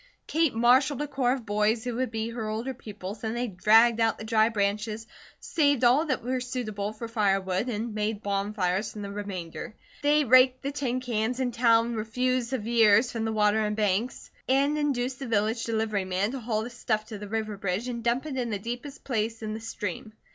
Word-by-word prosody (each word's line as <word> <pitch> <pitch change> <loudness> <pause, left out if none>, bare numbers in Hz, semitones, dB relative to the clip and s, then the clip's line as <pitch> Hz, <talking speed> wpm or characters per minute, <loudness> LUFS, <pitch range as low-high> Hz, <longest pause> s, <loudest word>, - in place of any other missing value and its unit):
Kate 320 -5 +1
marshalled 255 +4 +4
a - - -4
corps 255 -3 +1
of 260 -4 -5
boys 210 +2 +1
who 245 -1 -3
would 255 0 0
be 225 0 -3
her 230 -2 -4
older 230 +5 -3
pupils 210 -3 -8
and 220 +1 -2
they 245 - 0
dragged 225 +3 +4
out 225 0 +2
the - - -8
dry 220 0 +3
branches, 210 +1 -1 0.3
saved 285 -5 +1
all 265 +7 +4
that 260 -4 -1
were 255 +1 -1
suitable 225 -5 -3
for 220 +2 -7
firewood, 195 -1 0
and 225 0 -3
made 210 0 -2
bonfires 200 -1 -1
from 210 - -7
the 200 - -6
remainder. 200 +2 -6 0.3
They 295 +1 +4
raked 255 +1 +5
the 280 - -2
tin 255 -3 -2
cans 240 0 -1
and 250 -2 -1
town 230 0 +3
refuse 245 +3 -1
of 250 -6 -2
years 230 0 +4
from 225 -1 -3
the 225 - -1
water 215 0 +2
and 210 0 -1
banks 210 +3 -1 0.2
and 280 +3 +3
induced 265 -4 -1
the 270 - -5
village 225 +1 0
delivery 220 -3 -1
man 190 +4 0
to 270 - -4
haul 220 -2 -1
the 240 - -7
stuff 215 -2 -1
to 215 -3 -6
the 210 - -7
river 215 -1 -2
bridge 195 +4 -2
and 235 -2 -4
dump 240 +4 +1
it 285 -4 -4
in 245 -2 -1
the 210 - -1
deepest 245 +7 -7
place 225 -2 -2
in 215 0 -3
the 220 - -5
stream. 225 0 -5
225 Hz, 210 wpm, -27 LUFS, 210-250 Hz, 0.3 s, raked